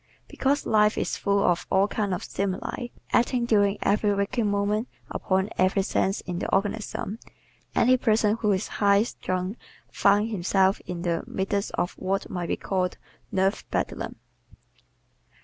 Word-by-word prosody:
Because 280 +2 0
life 210 -1 +3
is - - -1
full 200 0 +1
of 175 -1 +1
all 190 +1 +3
kinds 205 -2 -1
of - - -6
stimuli, 200 +5 -3 0.3
acting 240 0 +2
during 205 -3 +3
every 205 0 +2
waking 210 +2 0
moment 205 +3 0 0.2
upon 190 +3 0
every 185 +1 +3
sense 195 +1 0
in 175 -1 -4
the - - -3
organism, 210 +1 -1 0.6
any 255 +2 +5
person 220 -3 +2
who 210 -2 +1
is 190 +1 0
high 200 0 +5
strung 185 -2 -3 0.3
finds 205 +3 +3
himself 190 0 +2
in 175 -1 -4
the 170 -2 0
midst 200 +1 -1
of 175 0 -1
what 195 +1 -2
might 175 -2 -3
be - - -1
called 185 -2 -1 0.3
"nerve 195 +2 +1
bedlam." - - -2
200 Hz, 150 wpm, -26 LUFS, 190-215 Hz, 0.6 s, any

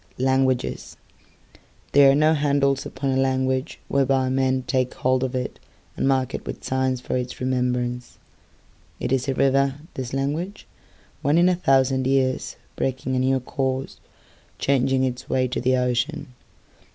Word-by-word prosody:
Languages 130 0 0 0.9
THERE 140 -1 +7
are - - +2
no 155 +2 +4
handles 140 -2 +1
upon 135 -1 -3
a 130 - +1
languageWhereby 130 0 0
men 130 0 +1
take 130 -1 0
hold 130 0 +1
of 130 0 -2
itAnd 125 -1 -4 0.5
mark 130 -2 +1
it - - -4
with - - -6
signs 130 -1 0
for 125 - -4
its 125 0 -3
remembrance.It 125 -1 -5
is 135 0 +1
a 135 - 0
river, 135 0 +2 0.2
this 130 -2 -5
language, 150 +9 -3 0.6
Once 145 +4 +2
in 175 +1 +5
a 180 - +2
thousand 135 -5 +2
yearsBreaking 130 -1 -1
a - - +1
new 130 +1 +2
courseChanging 130 0 -2
its 125 -1 -6
way 130 0 +1
to 125 - -3
the 130 +1 +2
ocean. 125 0 -1
130 Hz, 135 wpm, -23 LUFS, 130-135 Hz, 0.9 s, THERE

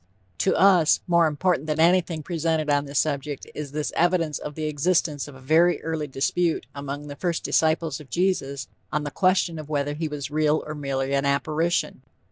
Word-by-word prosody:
To - - +2
us, 185 -5 +5
more 170 -2 +4
important 155 0 0
than 155 0 -1
anything 170 -1 +3
presented 160 -2 -1
on 145 0 +2
this 140 0 -4
subject, 145 -2 -1
is 150 -2 -6
this 150 0 -3
evidence 170 -3 +1
of 150 - -7
the 155 - -4
existence 150 -1 0
of 145 - -11
a - - -13
very 160 +5 +3
early 160 -2 -2
dispute 160 +5 0
among 140 +1 -6
the 145 -1 -7
first 170 +1 -2
disciples 160 0 +1
of 150 -3 -13
Jesus 175 -7 -1 0.2
on 150 - -1
the 145 - -4
question 185 -3 +1
of 155 -1 -9
whether 145 -1 -1
he 160 +2 -3
was 150 -2 -5
real 155 0 +1
or 155 - -5
merely 135 -2 -2
an 140 0 +1
apparition. 155 +1 0
155 Hz, 190 wpm, -24 LUFS, 145-165 Hz, 0.2 s, us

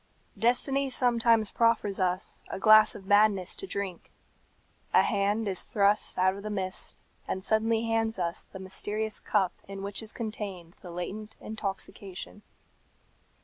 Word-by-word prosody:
Destiny 270 +4 +2
sometimes 235 -4 +3
proffers 230 -4 +2
us 185 0 -1
a - - -4
glass 215 +2 +7
of 195 - -10
madness 205 -2 +3
to 390 - -6
drink. 195 - -5 0.9
A - - +7
hand 205 +1 0
is 190 -2 -1
thrust 205 0 +2
out 185 +1 +3
of 200 - -8
the 215 - -5
mist, 190 -2 -4 0.3
and 190 - -3
suddenly 225 +2 +2
hands 225 -1 0
us 170 -2 -2
the - - -11
mysterious 210 +3 -3
cup 195 -4 +1
in 195 0 -7
which 200 +2 -4
is 220 0 -5
contained 200 -6 -6
the 180 - -10
latent 195 +5 -6
intoxication. 200 -2 -6
205 Hz, 145 wpm, -29 LUFS, 190-220 Hz, 0.9 s, glass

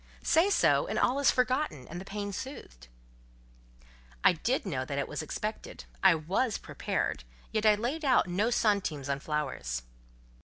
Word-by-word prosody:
Say 335 +5 +4
so, - - +3
and - - -2
all 260 +3 +2
is 280 - +4
forgotten, 255 - 0
and 175 +3 -7
the - - -10
pain 205 0 -4
soothed." 180 - -8 1.4
"I - - +6
did 235 - -1
know 135 -9 -2
that 140 +2 -4
it 140 - -1
was 150 +1 -4
expected: 215 +7 -5 0.2
I 190 -3 +6
was 190 +9 0
prepared; - - -3 0.3
yet 215 0 +1
I 210 - +7
laid 250 +10 -3
out 260 -8 +4
no 195 +6 +1
centimes 200 - 0
on 140 0 0
flowers." 135 - -3
200 Hz, 160 wpm, -30 LUFS, 150-245 Hz, 1.4 s, I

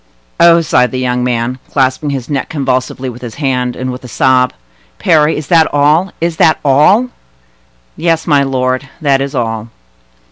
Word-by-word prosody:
"Oh!" 170 0 +6
sighed 130 -5 +2
the 130 - -5
young 125 -1 -1
man, 125 +1 -2
clasping 130 +1 0
his 135 -4 -4
neck 140 -3 -3
convulsively 130 -2 -2
with 125 -1 -8
his 120 -3 -8
hand, 125 -4 -1
and 130 0 -4
with 125 +1 -8
a - - -9
sob. 125 +1 +2 0.5
"Parry, 155 - +2
is 150 - -5
that 165 -2 +4
all?—is 160 +3 +1
that 160 - +3
all?" 170 - +4 0.9
"Yes, 165 -1 0
my 145 -3 +3
lord; 130 0 -1
that 140 -4 +1
is 140 +1 -4
all." 115 -2 -3
135 Hz, 165 wpm, -13 LUFS, 125-155 Hz, 0.9 s, Oh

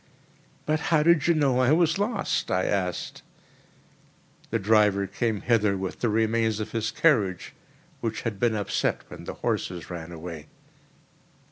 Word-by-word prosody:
"But 155 +1 +1
how 155 -2 +4
did 170 -2 +4
you 170 - +4
know 135 -5 +2
I 130 +1 +3
was 165 +2 +2
lost?" 205 0 -1
I 95 0 +1
asked. 90 -4 -2 1.3
"The 115 - 0
driver 105 -2 +3
came 110 0 -2
hither 105 -4 +2
with 95 0 -5
the 120 - +1
remains 110 0 +1
of 110 0 -4
his 115 -1 -1
carriage, 100 - +1 0.5
which 110 -1 -3
had 110 -4 -3
been 120 -2 +2
upset 100 -2 -1
when - - -10
the - - -6
horses 90 -1 -2
ran 85 -1 -7
away." 80 -2 -8
110 Hz, 150 wpm, -26 LUFS, 95-130 Hz, 1.3 s, how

